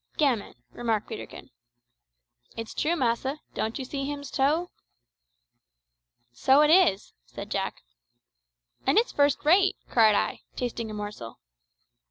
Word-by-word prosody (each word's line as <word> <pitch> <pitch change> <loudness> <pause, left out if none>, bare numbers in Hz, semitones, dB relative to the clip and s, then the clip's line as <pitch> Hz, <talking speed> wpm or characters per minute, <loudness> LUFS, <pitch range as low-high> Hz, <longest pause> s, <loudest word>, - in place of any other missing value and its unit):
"Gammon," 260 -9 +1 0.2
remarked 225 -3 -2
Peterkin. 220 - -9 1.1
"It's 225 -1 -6
true, 325 +3 0
massa. 265 +1 -1
Don't 220 +1 -2
you 265 - -5
see 275 +1 -4
him's 285 -1 -6
toe?" 305 +6 +1 1.6
"So 265 - +4
it 300 0 +5
is," 330 - +4
said - - -9
Jack. - - -3 1.0
"And 270 - +3
it's 460 - +3
first 285 0 +1
rate," 375 +5 +4 0.2
cried 220 -3 +5
I, - - 0 0.2
tasting 235 -2 -3
a - - -6
morsel. 205 - -7
265 Hz, 125 wpm, -27 LUFS, 220-295 Hz, 1.6 s, it